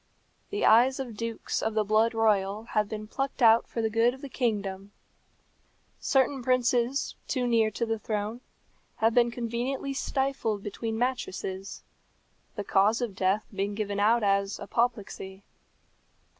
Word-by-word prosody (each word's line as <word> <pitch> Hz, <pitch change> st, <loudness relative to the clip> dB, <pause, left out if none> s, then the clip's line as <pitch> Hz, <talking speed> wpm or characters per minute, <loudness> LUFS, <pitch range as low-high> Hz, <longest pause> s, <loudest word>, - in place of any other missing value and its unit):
The 410 Hz, -, -1 dB
eyes 245 Hz, +5 st, +5 dB
of 245 Hz, -5 st, -5 dB
dukes 230 Hz, +1 st, -3 dB
of 220 Hz, 0 st, -2 dB
the 215 Hz, -, +3 dB
blood 220 Hz, +2 st, +2 dB
royal 210 Hz, -2 st, +1 dB
have 215 Hz, -2 st, -1 dB
been 215 Hz, -1 st, -5 dB
plucked 270 Hz, +4 st, -3 dB
out 225 Hz, 0 st, +6 dB
for 230 Hz, -, -3 dB
the 220 Hz, -, +1 dB
good 230 Hz, +3 st, +3 dB
of 265 Hz, -, -16 dB
the 280 Hz, -, -7 dB
kingdom. 205 Hz, -6 st, -2 dB, 1.1 s
Certain 270 Hz, 0 st, +1 dB
princes, 250 Hz, +1 st, +1 dB
too 255 Hz, -2 st, -1 dB
near 230 Hz, -2 st, +3 dB
to 225 Hz, +3 st, -2 dB
the 225 Hz, -1 st, -2 dB
throne, 215 Hz, +2 st, -3 dB, 0.5 s
have 225 Hz, +1 st, +2 dB
been 240 Hz, 0 st, +4 dB
conveniently 245 Hz, +4 st, -3 dB
stifled 265 Hz, -7 st, -1 dB
between 220 Hz, +2 st, -4 dB
mattresses, 195 Hz, -6 st, -3 dB, 0.7 s
the 205 Hz, -, -3 dB
cause 205 Hz, +4 st, +3 dB
of 240 Hz, -5 st, -3 dB
death 190 Hz, +3 st, +1 dB
being 200 Hz, +1 st, -2 dB
given 205 Hz, -1 st, -2 dB
out 220 Hz, +3 st, +3 dB
as 200 Hz, 0 st, +1 dB
apoplexy. 205 Hz, -5 st, -2 dB
225 Hz, 145 wpm, -28 LUFS, 205-245 Hz, 1.1 s, out